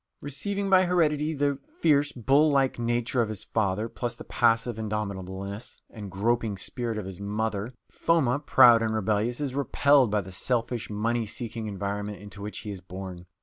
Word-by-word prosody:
Receiving 200 +8 -3
by 185 -1 +5
heredity 160 -3 +1
the 140 -1 0 0.2
fierce, 145 -3 +3
bull 135 +6 +3
like 135 -3 +2
nature 120 +1 0
of 115 - -1
his 110 -3 -5
father 105 0 0
plus 120 0 -4
the - - -10
passive 115 0 +1
indomitableness 100 -1 -4
and 105 -3 -8
groping 110 +2 0
spirit 115 +2 -2
of 105 - -4
his 95 -2 -7
mother, 110 +2 -2 0.2
Foma, 140 -6 +2
proud 120 -5 +6
and 110 -1 0
rebellious, 110 +4 0
is 140 -3 -2
repelled 140 -2 +3
by 105 0 +1
the 95 0 -10
selfish, 120 +3 -1
money 115 +2 -1
seeking 115 0 -4
environment 100 +1 -4
into 100 0 -10
which 105 +1 -5
he 105 - -6
is 95 -2 -7
born. 90 -1 -8
115 Hz, 170 wpm, -27 LUFS, 105-135 Hz, 0.2 s, proud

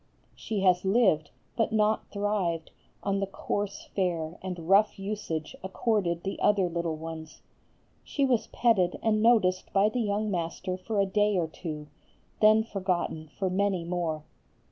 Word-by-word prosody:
"She 210 -3 -3
has 180 -2 +4
lived, 190 -7 +3 0.3
but 225 -1 +1
not 215 0 +2
thrived, 200 -6 -1 0.3
on 200 -1 0
the 195 - -1
coarse 200 +1 -3
fare 170 -4 -1
and 180 -3 -6
rough 200 +3 +4
usage 195 -6 -4
accorded 190 -3 0
the 195 - -4
other 200 -3 +3
little 170 -1 -2
ones. 160 0 -8 0.6
She 280 - 0
was 250 -4 +1
petted 195 -7 +2
and 215 -1 +2
noticed 210 -6 +3
by 200 +2 +4
the 245 +3 -1
young 210 0 0
master 180 +1 -2
for 205 +3 -3
a 200 - +4
day 205 +1 +2
or 175 - +2
two, 155 -2 -6 0.5
then 215 +1 +6
forgotten 185 -6 -2
for 195 - 0
many 190 -1 0
more. 165 -3 -2
190 Hz, 150 wpm, -28 LUFS, 170-210 Hz, 0.6 s, then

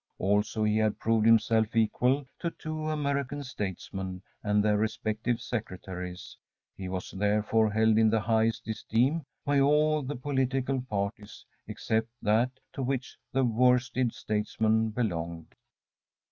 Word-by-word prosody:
Also 105 +2 +1
he 105 0 +2
had 110 -1 +1
proved 115 -1 +2
himself 115 -1 +4
equal 125 +5 +2
to 170 - -1
two 155 -1 -5
American 140 -2 -1
statesmen 95 -5 -5 0.2
and 105 0 +2
their 105 -1 +3
respective 110 +2 -1
secretaries. 95 -6 -6 0.4
He 95 -1 -6
was, 95 0 -4
therefore, 105 +2 +2
held 110 +1 +3
in 110 -1 +5
the 110 0 +2
highest 110 +1 +1
esteem 125 +8 0 0.2
by 145 0 +3
all 150 +2 +3
the 140 +2 -4
political 130 0 0
parties 105 -3 -4 0.2
except 110 +1 -1
that 110 +4 +3 0.2
to - - -4
which 130 0 -2 0.2
the 135 0 +2
worsted 125 +1 +2
statesmen 110 +1 0
belonged. 85 -8 -3
110 Hz, 130 wpm, -29 LUFS, 105-130 Hz, 0.4 s, in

